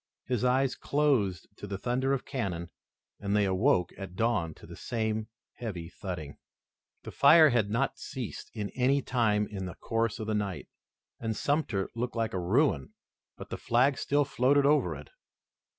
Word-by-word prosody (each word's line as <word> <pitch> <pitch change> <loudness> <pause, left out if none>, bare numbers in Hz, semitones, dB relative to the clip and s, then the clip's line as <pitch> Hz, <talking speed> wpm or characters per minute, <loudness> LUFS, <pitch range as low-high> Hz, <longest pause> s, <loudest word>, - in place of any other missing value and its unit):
His 125 -2 -1
eyes 130 +1 +3
closed 130 -11 +1
to 105 - -7
the 100 -1 -4
thunder 125 +5 0
of 135 -2 -1
cannon 90 - -3 0.5
and 100 0 -1
they 105 -1 +3
awoke 90 -2 +2
at 95 -2 -7
dawn 105 -8 0
to - - -14
the - - -10
same 110 -2 -2 0.3
heavy 90 -9 -5
thudding. 85 -7 -6 0.7
The - - -7
fire 160 -1 +7
had 115 -4 +2
not 115 +6 0
ceased 125 -5 -6
at 105 -1 -3
any 135 +2 +2
time 105 -4 +2
in 95 -3 -5
the 90 - -7
course 115 -1 -1
of 110 - -5
the 110 - -1
night, 100 -3 -2 0.5
and 110 -1 -2
Sumter 140 -10 0
looked 120 +1 -3
like 115 -1 -1
a 95 - -1
ruin, 90 - +1 0.4
but - - -9
the - - -3
flag 130 +4 +2
still 145 0 +2
floated 135 +2 +3
over 150 +1 +3
it. - - -11
115 Hz, 170 wpm, -29 LUFS, 100-130 Hz, 0.7 s, fire